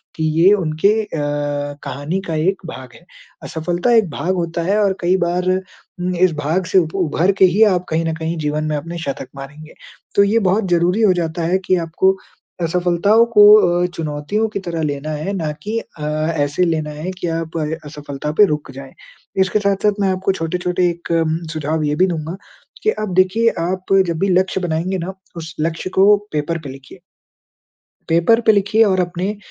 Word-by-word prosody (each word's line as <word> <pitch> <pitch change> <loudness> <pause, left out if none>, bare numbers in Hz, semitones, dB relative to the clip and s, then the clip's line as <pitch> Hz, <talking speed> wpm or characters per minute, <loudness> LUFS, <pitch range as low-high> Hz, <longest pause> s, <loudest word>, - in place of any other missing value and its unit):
कि 160 - -3 0.2
ये 185 +3 +7
उनके 165 -1 +1
अ, - - -10 0.8
कहानी 145 +6 -3
का 165 - -2
एक 195 0 0
भाग 130 -1 -10
है। 175 - -18 0.4
असफलता 175 +7 -1
एक 220 -6 +3
भाग 165 +7 -2
होता 170 -1 -2
है 210 - +2
और 195 -1 +1
कई 180 +2 +2
बार 180 +1 -1
उम, 185 -1 -5
इस 180 +1 +3
भाग 170 +6 0
से - - +6
उ 170 - 0 0.2
उभर 165 +5 +1
के 190 - +8
ही 215 +4 +5
आप 180 0 -3
कहीं 160 +1 0
न 165 - -1
कहीं 160 +1 -3
जीवन 150 +1 -1
में 155 0 -1
अपने 165 +4 -6
शतक 135 -1 -4
मारेंगे। 145 +3 -10 0.4
तो 200 - +6
ये 210 +3 +2
बहुत 200 +1 0
ज़रूरी 175 +5 +2
हो 200 -4 +5
जाता 165 +1 -4
है 185 - +4
कि 185 - +3
आपको 190 +4 +2 0.4
असफलताओं 180 +6 +3
को 210 - +8 0.4
अ, - - +2
चुनौतियों 160 +8 -2
की 205 - -4
तरह 165 -2 -3
लेना 145 0 -3
है 155 +5 -3
ना 160 -4 -2
कि 215 +2 -2
अ, 155 -8 -12 0.3
ऐसे 145 +4 +1
लेना 160 -3 -1
है 155 +5 -5
कि 175 - -3
आप 165 0 -3 0.3
असफलता 145 0 -6
पे 210 - +9
रुक 150 -6 -3
जाएँ। 135 0 -11 0.5
इसके 190 +3 +2
साथ-साथ 200 +1 +1
मैं 195 - +2
आपको 185 +1 0
छोटे-छोटे 180 +1 -1
एक 170 0 -6 0.2
म 160 +1 0 0.2
सुझाव 155 0 -2
ये 150 0 0
भी 185 +5 +3
दूँगा 165 0 -4 0.5
कि 435 - +3 0.2
अब 190 - -5
देखिए 190 +5 +3
आप 185 +3 -2
जब 165 -2 -2
भी 195 - +1
लक्ष्य 190 +1 +1
बनाएँगे 175 +2 -1
ना 180 +3 -5 0.2
उस 165 -1 -8
लक्ष्य 165 +3 -2
को 200 +2 +7 0.2
पेपर 155 +3 -1
पे 140 - -7
लिखिए। 135 +6 -12 1.1
पेपर 170 +8 +3
पे 220 - +7
लिखिए 205 +2 +3
और 190 -3 +2
अपने 180 +3 -2
175 Hz, 190 wpm, -18 LUFS, 155-190 Hz, 1.1 s, पे